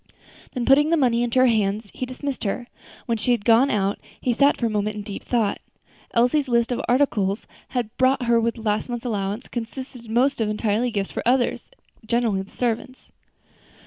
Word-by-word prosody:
Then, 245 -2 -1
putting 295 +3 +5
the 335 - +3
money 240 -5 +2
into 240 +1 0
her 255 - +6
hands, 210 -3 +1
he 255 - -4
dismissed 260 +1 -5
her. 225 +4 -2 0.4
When 230 -2 -1
she 215 - -1
had 225 -4 -2
gone 235 +4 +5
out 200 -3 0 0.2
he 245 - 0
sat 280 +4 +4
for 235 - -1
a - - +3
moment 210 0 -1
in 210 - -5
deep 200 -1 -7
thought. 225 -5 0 0.6
Elsie's 250 +5 +3
list 235 0 +2
of 245 - -1
articles 225 -6 +1 0.5
bought 260 +1 +4
with 245 - -3 0.3
her 230 - -10
last 210 +2 0
month's 240 0 -4
allowance 205 0 -2
consisted 245 +1 -7
almost 245 +3 +2
entirely 215 +2 0
of 235 - -5
gifts 195 -1 -1
for - - -3
others, 245 +1 +1 0.3
generally 225 -3 +1
the 195 - -10
servants. 245 +2 -3
235 Hz, 185 wpm, -23 LUFS, 215-255 Hz, 0.6 s, her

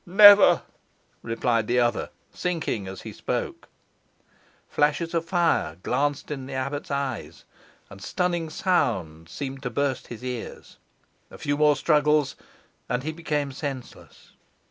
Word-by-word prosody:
"Never!" 205 +2 +8 0.6
replied 115 -1 0
the 125 - +1
other, 120 -1 +1 0.2
sinking 160 - -2
as 95 0 -8
he - - -7
spoke. - - -4 1.0
Flashes 150 +3 +1
of 165 -1 0
fire 165 - +1
glanced 145 +3 -1
in 135 -3 -5
the 135 - -7
abbot's 140 +2 -3
eyes, 140 -5 -4 0.4
and 95 - -13
stunning 175 - -1
sounds 90 - -1
seemed 135 -1 -5
to 130 - -3
burst 135 +2 -1
his 120 0 -9
ears. 125 -2 -6 0.5
A - - -12
few 145 -1 -1
more 150 0 +4
struggles, 150 -2 +2 0.5
and 125 +1 -1
he 155 - -2
became 150 -3 -2
senseless. 135 -2 -8
140 Hz, 130 wpm, -25 LUFS, 125-160 Hz, 1.0 s, Never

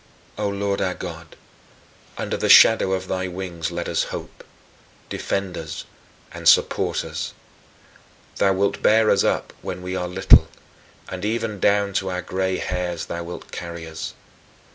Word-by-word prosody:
O 105 -1 -1
Lord 100 0 -1
our 90 -1 0
God, 85 -3 -8 0.8
under - - -2
the - - -1
shadow 110 -4 +7
of 95 0 -2
thy 95 0 -2
wings 90 -3 -4
let 85 0 -4
us - - 0
hope - - -8 0.7
defend 100 -2 -2
us 80 -2 -6 0.5
and - - +3
support - - +3
us. - - -5 1.0
Thou 95 - +3
wilt 100 +1 0
bear 110 0 +5
us - - +3
up - - 0
when 90 0 -6
we 90 +1 -4
are 90 -1 -2
little 90 +2 +6 0.6
and 95 0 -6
even 110 -1 -2
down 100 +1 +2
to 95 0 -1
our 90 -1 -3
gray 95 +1 -1
hairs 90 -2 -3
thou 85 0 -5
wilt 85 +1 -9
carry 85 -1 -6
us. 80 0 -6
95 Hz, 155 wpm, -23 LUFS, 90-100 Hz, 1.0 s, shadow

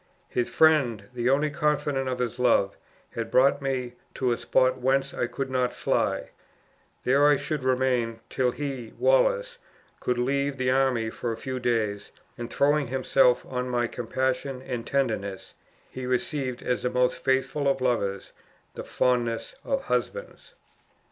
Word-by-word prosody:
His 120 -1 -1
friend, 140 -10 +3
the 120 0 0
only 145 +3 +2
confidant 145 -2 0
of 125 - -2
his 125 -1 -3
love, 115 -5 +3 0.4
had 115 -1 -4
brought 135 +4 +4
me 130 -3 -2 0.2
to 125 -2 0
a 120 - +1
spot 130 0 +2
whence 135 +2 +1
I 120 - -1
could 135 +2 -4
not 125 -1 0
fly; - - 0 0.7
there 140 +3 +4
I 145 -1 +5
should 150 -2 -3
remain, 125 -3 +1
till 130 -1 +1
he, 130 -4 -5
Wallace, - - +2 0.4
could 125 - -1
leave 140 +2 0
the 130 0 +1
army 130 -4 +1
for 120 - -3
a 115 - -4
few 130 0 -4
days, 110 -4 -1 0.2
and 120 -1 -7
throwing 145 0 +2
himself 130 0 +3
on 125 -1 -3
my 120 -1 +1
compassion 130 +3 -2
and 120 -3 -5
tenderness, 110 -8 -2 0.4
he 130 -1 -6
received 125 +1 -2
as 125 - -1
the 125 - 0
most 125 0 +2
faithful 135 +2 +1
of 135 -1 +2
lovers, 105 -6 -1 0.4
the - - -6
fondest 120 -2 0
of 270 -1 -1
husbands. - - -3
130 Hz, 155 wpm, -26 LUFS, 120-140 Hz, 0.7 s, I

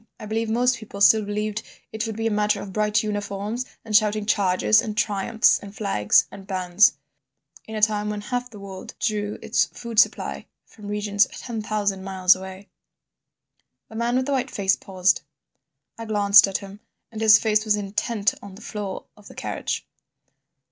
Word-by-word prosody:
I 215 - -8
believe 220 +1 -2
most 245 +3 +2
people 215 -2 -10
still 215 +2 +6
believed 210 +1 -3 0.3
it 220 +1 -3
would 220 - -5
be 225 +1 -3
a 225 - +1
matter 210 0 +1
of 195 - -8
bright 210 +1 +1
uniforms 210 +3 -3 0.2
and 215 -1 -2
shouting 215 -1 +3
charges 185 - +3
and 215 -1 -6
triumphs 210 +1 +2
and 200 0 -11
flags 195 - +2
and 195 -1 -12
bands—in 175 - -1
a 215 - -3
time 210 -1 +2
when 210 -1 -4
half 245 +3 -3
the 220 - -12
world 195 -1 -9
drew 210 -1 -2
its 220 - +2
food 235 -2 -3
supply - - +1 0.2
from 210 -2 -13
regions 205 0 +1
ten 230 -3 -6
thousand 205 -3 -2
miles 190 -1 +3
away—" 190 +1 -10 1.2
The 220 - -12
man 235 +2 0
with 260 0 +1
the 285 - -3
white 265 -1 0
face 195 -3 +1
paused. 185 -1 0 0.8
I 230 - -5
glanced 205 -2 +6
at 195 - -1
him, 200 0 -11 0.3
and 220 -1 -7
his 220 0 +8
face 215 -1 +1
was 215 -1 +2
intent 210 +1 -1
on 200 -2 -11
the 205 - -14
floor 205 -2 -6
of 210 -1 -17
the - - -13
carriage. - - -4
210 Hz, 175 wpm, -23 LUFS, 200-220 Hz, 1.2 s, his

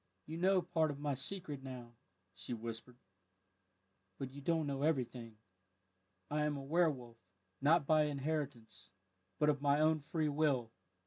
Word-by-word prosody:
"You 160 +2 -5
know 185 0 +4
part 165 -2 +1
of 145 - -4
my 145 -1 0
secret 145 +1 -3
now," 125 -3 -8 0.4
she 95 +6 -5
whispered, 115 +2 -7 1.2
"but 135 -1 -5
you 140 +1 -9
don't 160 +1 +1
know 140 -1 -2
everything. 125 -7 -1 0.9
I 150 - +1
am 150 -1 0
a 135 - -6
werwolf, 135 -6 +1 0.4
not 150 +2 +5
by 155 +1 +4
inheritance, 145 -5 -3 0.5
but 150 - +3
of 145 -2 +1
my 145 0 +3
own 155 0 +4
free 155 +2 -1
will. 140 -6 +1
145 Hz, 145 wpm, -36 LUFS, 130-155 Hz, 1.2 s, not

